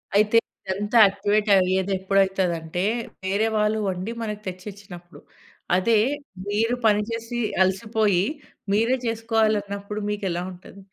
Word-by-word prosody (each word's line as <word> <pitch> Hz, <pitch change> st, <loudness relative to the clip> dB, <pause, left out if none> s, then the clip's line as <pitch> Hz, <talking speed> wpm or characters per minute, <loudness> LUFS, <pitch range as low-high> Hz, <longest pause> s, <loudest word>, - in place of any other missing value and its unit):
అయితే 210 Hz, +2 st, +3 dB, 0.3 s
ఇదంతా 205 Hz, +4 st, -1 dB
యాక్టివేట్ 205 Hz, +2 st, +1 dB
అయ్యేది 190 Hz, +1 st, +2 dB
ఎప్పుడైతదంటే 190 Hz, -3 st, 0 dB, 0.4 s
వేరే 200 Hz, +4 st, +1 dB
వాళ్ళు 210 Hz, +1 st, +2 dB
వండి 185 Hz, +4 st, -4 dB
మనకు 210 Hz, -2 st, -4 dB
తెచ్చిచ్చినప్పుడు. 185 Hz, -2 st, -9 dB, 0.5 s
అదే 210 Hz, +4 st, +3 dB, 0.5 s
మీరు 225 Hz, +4 st, +1 dB
పనిచేసి 230 Hz, +3 st, -1 dB, 0.2 s
అలసిపోయి 200 Hz, 0 st, +1 dB, 0.5 s
మీరే 230 Hz, +5 st, +3 dB
చేసుకోవాలన్నప్పుడు 215 Hz, -3 st, -1 dB
మీకు 210 Hz, 0 st, -3 dB
ఎలా 175 Hz, -, -2 dB
ఉంటది? 185 Hz, +2 st, -14 dB
205 Hz, 105 wpm, -24 LUFS, 190-220 Hz, 0.5 s, అయితే